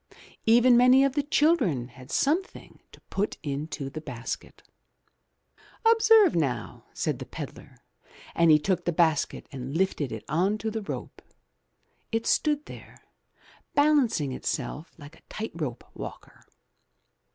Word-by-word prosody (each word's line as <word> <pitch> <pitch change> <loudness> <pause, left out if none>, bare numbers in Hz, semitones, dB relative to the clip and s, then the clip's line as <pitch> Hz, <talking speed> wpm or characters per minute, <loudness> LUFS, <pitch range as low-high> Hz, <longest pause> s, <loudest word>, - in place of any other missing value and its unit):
Even 240 +2 +6
many 250 +2 +6
of 275 -1 +2
the 290 - +1
children 280 - +2
had 130 +1 -14
some 310 +7 +2
thing - - -15
to - - -16
put 205 +2 -1
into 145 0 -4
the 155 +3 -7
basket. 125 -5 -7 1.2
''Observe 445 -4 +6
now," 140 -7 -2
said - - -2
the - - -6
pedlar, - - -9 0.6
and 170 -1 +3
he 155 - +8
took 180 +3 -1
the 175 - +1
basket 160 -3 +1
and 135 +2 -5
lifted 175 -7 0
it 110 - -7
on 185 +8 +1
to 220 +1 -3
the 220 0 -3
rope. 200 - -7 0.9
It 225 0 -1
stood 300 -1 +1
there, - - -13 0.7
balancing 285 - +3
itself 145 +4 -4
like 150 +1 -13
a - - -38
tight 220 +1 -5
rope 145 -8 -5
walker. - - -10
175 Hz, 140 wpm, -27 LUFS, -, 1.2 s, he